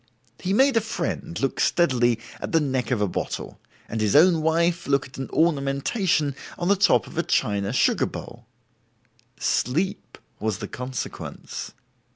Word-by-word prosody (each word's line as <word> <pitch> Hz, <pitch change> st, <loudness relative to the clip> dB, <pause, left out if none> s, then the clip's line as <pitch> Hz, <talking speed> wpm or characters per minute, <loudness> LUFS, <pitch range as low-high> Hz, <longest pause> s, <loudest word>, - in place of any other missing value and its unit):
He 185 Hz, -, -2 dB
made 265 Hz, +5 st, +4 dB
a -, -, +4 dB
friend 180 Hz, -5 st, -3 dB
look 135 Hz, -, -1 dB
steadily 120 Hz, -8 st, +3 dB, 0.2 s
at -, -, -5 dB
the 165 Hz, -, +5 dB
neck 130 Hz, -4 st, -1 dB
of 120 Hz, -5 st, 0 dB
a 105 Hz, -, +2 dB
bottle, -, -, -4 dB, 0.3 s
and 110 Hz, 0 st, -3 dB
his 105 Hz, -2 st, +2 dB
own 165 Hz, +1 st, +6 dB
wife 170 Hz, +2 st, +1 dB
look 140 Hz, 0 st, +2 dB
at 130 Hz, -, -12 dB
an 135 Hz, -, -4 dB
ornamentation 150 Hz, -, +1 dB, 0.2 s
on 175 Hz, +1 st, -1 dB
the 200 Hz, -, +6 dB
top 195 Hz, +1 st, +4 dB
of -, -, -6 dB
a -, -, +5 dB
china 100 Hz, -10 st, 0 dB
sugar 130 Hz, -, +2 dB
bowl: -, -, -9 dB, 0.9 s
sleep 180 Hz, -, -1 dB, 0.2 s
was 110 Hz, -3 st, -1 dB
the -, -, -6 dB
consequence. 125 Hz, +2 st, -6 dB
145 Hz, 160 wpm, -24 LUFS, 125-175 Hz, 0.9 s, own